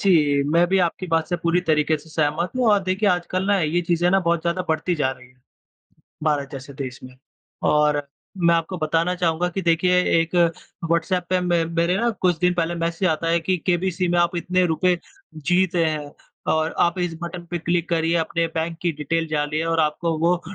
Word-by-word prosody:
जी, 150 -7 +3
मैं 170 +2 +4
भी 195 - +2
आपकी 180 +1 -1
बात 165 -1 0
से 175 - 0
पूरी 170 +1 +1
तरीके 155 -2 +1
से 155 - -17
सहमत 155 +2 0
हूँ 250 - +1
और 205 -1 +4
देखिए 190 +3 +1
आजकल 185 +1 -1
न 200 - +3
ये 160 +3 +1
चीजें 175 +1 +1
न 195 +1 +3
बहुत 170 -1 +2
ज़्यादा 170 +2 -1
बढ़ती 160 +3 0
जा 145 -5 0
रही 125 -1 -11
हैं, 125 0 -27 0.8
भारत 145 -3 0
जैसे 135 0 -8
देश 130 -2 -6
में। 130 - -11 0.6
और 150 -1 +2 0.4
मैं 170 -1 +4
आपको 165 +3 -1
बताना 165 +3 0
चाहूँगा 175 0 0
कि 190 +2 -4
देखिए 180 +2 +3 0.2
एक 165 +1 -3 0.5
व्हाट्सऐप 170 +2 0
पे 185 - +2
मैं 175 -2 +1
मेरे 170 +2 +2
न 235 0 +2
कुछ 180 -3 +2
दिन 180 +1 +2
पहले 170 0 -1
मैसेज 170 +2 -1
आता 160 0 -1
है 170 - +2
कि 185 +3 0
केबीसी 180 0 0
में 175 0 +2
आप 175 0 +2
इतने 180 +2 +1
रुपए 175 +2 +1 0.5
जीते 180 0 +2
हैं 150 -2 -3 0.4
और 160 +1 0
आप 170 +1 +2
इस 175 -2 -1
बटन 170 0 -6
पे 175 - -2
क्लिक 170 +1 -1
करिए 165 0 +1
अपने 165 0 0
बैंक 165 +1 -2
की 175 -2 +1
डिटेल 165 +3 -2
डालिए 155 +1 -1
और 165 0 +1
आपको 160 +2 0
वो 175 +2 +2
170 Hz, 205 wpm, -22 LUFS, 160-180 Hz, 0.8 s, मैं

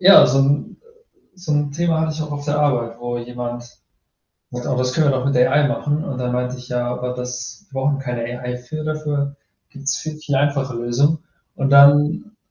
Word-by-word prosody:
Ja, 195 +2 +9
so 135 - +2
'n, 140 +2 +1
äh 465 - -30
so 175 -4 -4
'n 145 -1 +1
Thema 165 +1 +1
hatte 160 0 0
ich 155 0 -4
auch 150 - -6
auf 145 0 -5
der 150 0 0
Arbeit, 120 -5 0
wo 120 0 -4
jemand 120 0 -7 0.8
„Oh, 125 - -4 0.2
das 125 0 0
können 155 +2 +2
wir 130 - 0
doch 130 - -2
mit 140 - +1
AI 140 +4 +4
machen.“ 145 +1 -1
Und 135 -4 -5
dann 125 -1 -2
meinte 125 +1 -2
ich: 125 0 -11
„Ja, 125 -1 -1
aber 125 +1 -3
das 125 +8 -6
wir 135 - -3
brauchen 140 +1 +1
keine 125 -3 -4
AI. 125 +1 -4
Für 155 +5 -7
dafür 150 -2 -2 0.3
gibt's 140 -1 -2
viel 155 -1 -6
viel 150 -2 -3
einfachere 135 -2 0
Lösungen.“ 135 +7 +1 0.4
Und 135 0 0
dann 145 +8 +5
140 Hz, 205 wpm, -20 LUFS, 125-150 Hz, 0.8 s, Ja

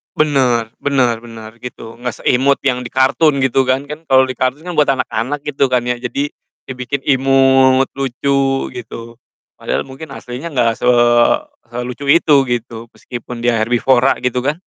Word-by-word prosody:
Bener, 125 -7 +1
benar 125 -5 +1
benar 115 -2 -10
gitu, 115 -2 -9
enggak 125 -1 -5
seimut 135 +3 +3
yang 125 -2 +1
di - - -3
kartun 140 +3 +3
gitu 135 0 +2
kan, 130 +2 +1
kan 150 +2 -7
kalau 130 0 +6
di 130 - -4
kartun 130 +5 -1
kan 180 - -5
buat 150 - +4
anak-anak 135 +2 -2
gitu 140 -2 +1
kan 125 -1 +1
ya. 125 0 -1
Jadi 140 +4 -3 0.4
dibikin 130 +1 -4
imut, 135 -1 +4
lucu 135 0 -1
gitu, 115 0 -9 0.4
padahal - - -2
mungkin 135 +4 -10
aslinya 125 +6 -7
enggak 120 -3 +2
se - - -3 0.8
selucu 125 +3 -6
itu 160 -1 +4 0.2
gitu, 115 -1 -4
meskipun 120 -1 -8
dia 115 -2 +2
herbivora 120 +3 +2
gitu 125 0 0
kan. 145 +2 +1
130 Hz, 160 wpm, -16 LUFS, 120-140 Hz, 0.8 s, kalau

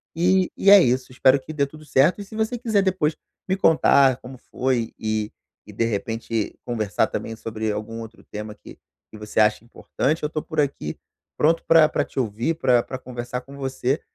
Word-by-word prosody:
e 180 +2 +2
e 195 - +3
é 200 -1 +10
isso, 130 -2 0
espero 130 +2 +4
que 145 +4 -9
dê 145 -2 +1
tudo 155 +2 -14
certo, 150 +8 +3
e - - -8
se 205 - -12
você 220 +3 -1
quiser 225 -4 +1
depois 185 -5 0 0.3
me 190 - +1
contar 140 -7 +4
como 130 0 -11
foi 125 -3 -2
e 110 -1 -2 0.4
e, - - -10
de 115 - -1
repente, 115 0 -3
conversar 110 -6 0
também 115 - -5
sobre 110 -1 -4
algum 110 +2 -5
outro 115 0 -11
tema 105 0 -8
que - - -14 0.3
que 110 - -11
você 105 +1 -3
acha 105 0 +3
importante, 140 +6 -2
eu 150 - 0
tô 155 0 -3
por - - -5
aqui, 135 - -1 0.4
pronto 165 +2 +2
pra 165 -2 +7
pra - - -1
te - - -6
ouvir, 120 +6 -1
pra 125 -6 +3
pra 130 - -6
conversar 125 -1 -6
com 135 +2 -13
você, 135 +1 -2
130 Hz, 200 wpm, -23 LUFS, 115-155 Hz, 0.4 s, é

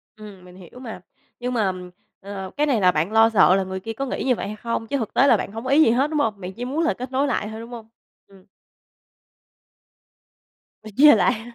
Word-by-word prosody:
Ừm, 205 -4 -13
mình 180 0 -15
hiểu 185 +6 -14
mà. 225 -7 -9 0.4
Nhưng 250 +1 -3
mà, 210 -5 +1 0.5
ờ, 195 -1 -7
cái 295 - +2
này 245 -7 +1
là 180 -1 +5
bạn 160 +4 -1
lo 225 0 +5
sợ 195 -4 +4
là 195 - 0
người 190 0 -6
kia 225 +4 -6
có 275 +5 -4
nghĩ 260 - -4
như 250 -2 +2
vậy - - -5
hay 210 - -6
không, 230 +1 -4
chứ 280 - -1
thực 225 -5 -5
tế 275 - +4
là - - +5
bạn - - -5
hông 225 +2 -7
có 260 - -5
ý 285 +3 +5
gì 225 - +3
hết, 265 +5 +1
đúng 305 -1 -1
không? 220 -7 -1
Bạn 185 +1 -7
chỉ 240 +4 -6
muốn 290 +6 -2
là 325 - +1
kết 255 +1 -8
nối 270 +2 0
lại 245 -5 -2
thôi, 220 - -8
đúng 230 - -10
hông? 230 -2 -10 0.4
Ừm. 195 -1 -20 2.4
Đòi 215 - -10
chơi 295 +2 +8
lại. 230 -2 0
225 Hz, 250 wpm, -22 LUFS, 195-255 Hz, 2.4 s, chơi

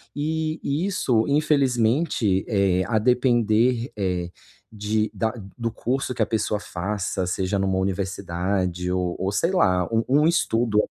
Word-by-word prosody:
e 155 +2 -2
e 145 +6 -1
isso, 130 - +1
infelizmente, 135 - +1
eh, 100 -4 +2
a 110 -2 +1
depender, 120 0 +2
eh, 90 -3 -1 0.4
de 105 0 -1
da 110 +1 -1 0.2
do 115 -1 -2
curso 130 +3 -2
que 120 - -4
a - - +4
pessoa 110 -1 -1
faça, 95 0 -3
seja 95 +2 -1
numa 95 -1 0
universidade, 95 -1 -2
ou 90 -1 -1
ou 95 +2 -1
sei 165 - +1
lá, 90 - +2
um 115 0 +2
um 145 +4 +4
estudo 120 -10 +1
110 Hz, 145 wpm, -24 LUFS, 95-130 Hz, 0.4 s, a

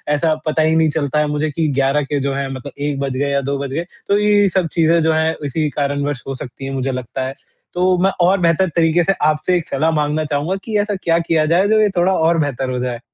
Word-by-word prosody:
ऐसा 160 +1 +1
पता 155 0 +1
ही 160 +1 +2
नहीं 160 -1 +3
चलता 150 -1 -1
है 150 - +1
मुझे 150 +1 -1
कि 160 +1 -1
11 135 +2 +2
के 145 - 0
जो 140 0 -1
है 135 0 -3
मतलब 130 +2 -8
1 145 -1 -2
बज 135 -2 -2
गए 140 +1 0
या 140 0 +1
2 140 +1 -2
बज 140 -1 -4
गए। 165 +4 -2 0.2
तो 200 - +3
ये 205 -1 +3
सब 185 -2 0
चीजें 165 0 +3
जो 160 0 +2
हैं, 160 +1 +1
इसी 150 +2 -1
कारणवश 145 -1 -2
हो 135 - -3
सकती 130 0 -8
हैं 135 - -4
मुझे 135 0 -1
लगता 130 +1 -4
है। 135 - -5 0.4
तो 180 +1 +2
मैं 195 - +3
और 185 +3 +4
बेहतर 170 +2 +2
तरीके 170 0 +3
से 195 - +2 0.2
आपसे 155 +4 0
एक 170 - -4
सलाह 155 +4 0
माँगना 150 0 0
चाहूँगा 150 +5 -1
कि 220 -2 -1
ऐसा 205 0 -1
क्या 165 -1 +2
किया 165 -2 +1
जाए, 175 +5 +3
जो 215 +1 +3
ये 210 - +3
थोड़ा 180 +2 +3
और 165 -1 +2
बेहतर 135 -3 -1
हो 125 - -2
जाए? 125 -1 -3
155 Hz, 260 wpm, -18 LUFS, 140-170 Hz, 0.4 s, और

